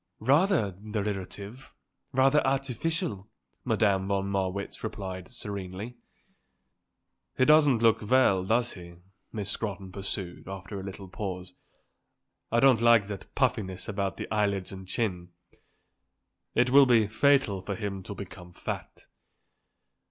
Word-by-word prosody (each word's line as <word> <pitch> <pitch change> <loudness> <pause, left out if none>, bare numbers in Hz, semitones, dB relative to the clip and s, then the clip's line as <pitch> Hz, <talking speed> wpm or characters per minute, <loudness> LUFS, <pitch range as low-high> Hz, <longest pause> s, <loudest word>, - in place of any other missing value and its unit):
"Rather 145 - +3
derivative; 105 +3 -5 0.4
rather 135 +3 +4
artificial," 135 - -1 0.3
Madame 95 -3 +2
von 100 -1 0
Marwitz 95 0 -2
replied 95 -4 -5
serenely. 100 0 -6 1.4
"He 130 - +4
doesn't 145 -6 +5
look 115 0 +4
well, 125 -8 +4
does 115 +5 +1
he?" 85 -2 -11 0.4
Miss 105 -2 -3
Scrotton 100 -4 -4
pursued, 95 -3 -5
after 95 +1 -6
a - - -7
little 95 0 -8
pause. 90 -1 -6 1.0
"I 120 - +3
don't 130 -4 +5
like 115 -3 +6
that 100 -2 -8
puffiness 115 -9 0
about 100 -3 -2
the - - -5
eyelids 100 -3 0
and 95 -1 -9
chin. 90 -4 -2 1.2
It 125 +1 +3
will 140 0 +8
be 115 -3 +5
fatal 110 -3 +2
for 100 +1 -4
him 100 -2 -4
to 100 +2 -7
become 90 -2 -10
fat." - - -6
100 Hz, 120 wpm, -28 LUFS, 95-120 Hz, 1.4 s, will